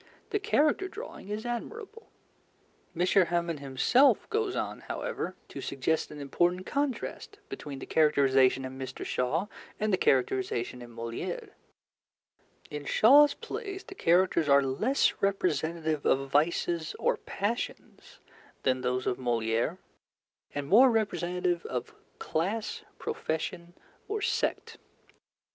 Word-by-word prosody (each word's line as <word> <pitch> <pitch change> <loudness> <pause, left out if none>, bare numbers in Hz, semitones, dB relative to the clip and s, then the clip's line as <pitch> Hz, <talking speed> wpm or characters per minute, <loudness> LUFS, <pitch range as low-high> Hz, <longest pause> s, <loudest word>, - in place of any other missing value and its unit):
_ - - -28 0.3
The 415 - +1
character 345 -1 +2
drawing 420 - -9
is 215 +2 -4
admirable.'" 435 - -6 0.9
M. 180 - +4
Hamon 170 -3 +2
himself 200 - +3
goes 435 -3 0
on, - - -3
however, - - -4
to - - -7
suggest 140 +4 -1
an 150 - -9
important 175 +6 0
contrast 285 - -3
between 140 -2 -6
the 135 - -7
characterization 135 -4 +3
in 130 0 -7
Mr. 130 - -6
Shaw 135 +9 0 0.3
and 215 -1 0
the - - +4
characterization 125 -1 +1
in 120 - -10
Molière: 115 0 -5 1.2
In 150 -1 -5
Shaw's 285 - +6
plays 390 -2 -6
the 420 - -10
characters 175 - +3
are 140 0 +6
less 215 - +1
representative 165 -5 0
of 135 0 +1
vices 160 +2 +1
or - - +2
passions 210 +5 -5 0.4
than 130 -1 +1
those 125 0 -1
of 125 - 0
Molière, 120 +5 0 0.8
and 145 -1 -3
more 245 - +7
representative 180 -5 0
of 125 -2 -4 0.2
class, 215 - -2 0.2
profession, 175 - -4 0.3
or 430 +1 -2
sect. - - -1
170 Hz, 120 wpm, -29 LUFS, 135-225 Hz, 1.2 s, more